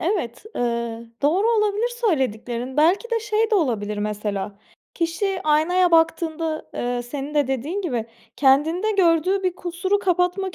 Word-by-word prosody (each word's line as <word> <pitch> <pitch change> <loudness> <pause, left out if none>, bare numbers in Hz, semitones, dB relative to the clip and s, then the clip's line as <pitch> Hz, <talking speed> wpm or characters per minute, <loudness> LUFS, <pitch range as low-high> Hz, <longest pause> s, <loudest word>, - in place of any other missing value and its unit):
Evet, 335 - -2
ııı, 235 -1 -2
doğru 355 +9 +3
olabilir 425 0 +1
söylediklerin. 260 - -2
Belki 365 +10 +3
de 460 - +1
şey 430 +1 0
de 435 - +3
olabilir 215 - 0
mesela 205 -1 -3 0.4
kişi 365 +3 -1
aynaya 335 +4 +3
baktığında, 325 -1 +1
eee, 245 0 -2
senin 275 +4 -6
de 290 -2 +3
dediğin 275 - -2
gibi 245 - -2 0.3
kendinde 310 +9 +3
gördüğü 370 +1 +2
bir 365 -1 0
kusuru 360 +3 -1
kapatmak 360 0 0
325 Hz, 135 wpm, -23 LUFS, 245-380 Hz, 0.4 s, doğru